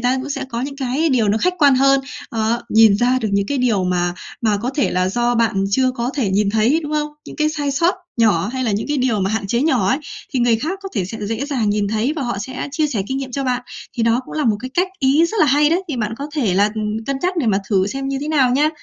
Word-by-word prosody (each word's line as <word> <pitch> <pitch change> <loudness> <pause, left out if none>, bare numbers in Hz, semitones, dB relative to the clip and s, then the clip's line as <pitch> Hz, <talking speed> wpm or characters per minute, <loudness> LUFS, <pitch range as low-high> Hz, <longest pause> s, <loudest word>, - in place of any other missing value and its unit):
ta 250 +2 +1
cũng 275 +2 -5
sẽ - - -3
có 235 -1 -4
những 275 +1 -5
cái 275 +4 0
điều 235 -6 +2
nó 210 - +2
khách 360 +8 +1
quan 285 -3 +5
hơn, 275 +1 +4 0.3
ờ, 225 +1 -1
nhìn 220 -2 +6
ra 250 +3 +2
được 220 - -1
những 200 0 +1
cái 280 - -1
điều 220 -7 +1
mà 175 -1 0 0.3
mà 215 -2 +2
có 250 - -1
thể 290 - +1
là 185 0 +1
do 240 +4 0
bạn 220 -4 +1
chưa 255 +4 +2
có 245 0 -3
thể 235 -9 0
nhìn 200 +1 +2
thấy, 225 +9 +2
đúng 300 0 -5
không? 300 0 0 0.2
Những - - -9
cái 305 0 +2
sai 290 -2 -2
sót 335 +6 +2 0.2
nhỏ 210 -5 +2
hay 260 -1 -2
là 225 - 0
những 205 +6 -2
cái 295 - 0
điều 240 -5 +1
mà 190 +1 0
hạn 215 -2 -2
chế 235 +6 0
nhỏ 285 -6 +2
ấy, 265 - +2 0.3
thì 255 - 0
người 235 -2 +3
khác 330 - -3
có 390 - -5
thể 195 -4 0
sẽ 220 +5 -7
dễ 225 +5 -2
dàng 240 -8 0
nhìn 205 -1 0
thấy 220 +7 0
và 285 - -2
họ 240 -5 -2
sẽ 260 +7 -5
chia 310 -1 +1
sẻ 220 -9 -2
kinh 265 +1 -2
nghiệm 265 -2 -6
cho 275 +1 -2
bạn. 250 -1 -1 0.3
Thì 230 - 0
đó 230 +2 +2
cũng - - -10
là 305 - -1
một 215 -3 +2 0.2
cách 365 +2 +2
ý 280 +4 +4
rất 435 +1 -2
là 310 - +5
hay 295 +3 +4
đấy. 350 +3 +2
Thì 290 - -3
bạn 220 -1 -2
có 285 - -4
thể 225 -11 +1
là, 205 +2 +3
ừm, 215 +1 -3
cân 275 -1 -1
nhắc 365 0 0
để 285 -8 0
mà 200 -2 +3
thử 190 -2 +2
xem 270 +5 -4
như 275 0 -2
thế 295 - -4
nào 275 -5 +3
nha. 290 +5 +3
250 Hz, 295 wpm, -19 LUFS, 215-280 Hz, 0.3 s, nhìn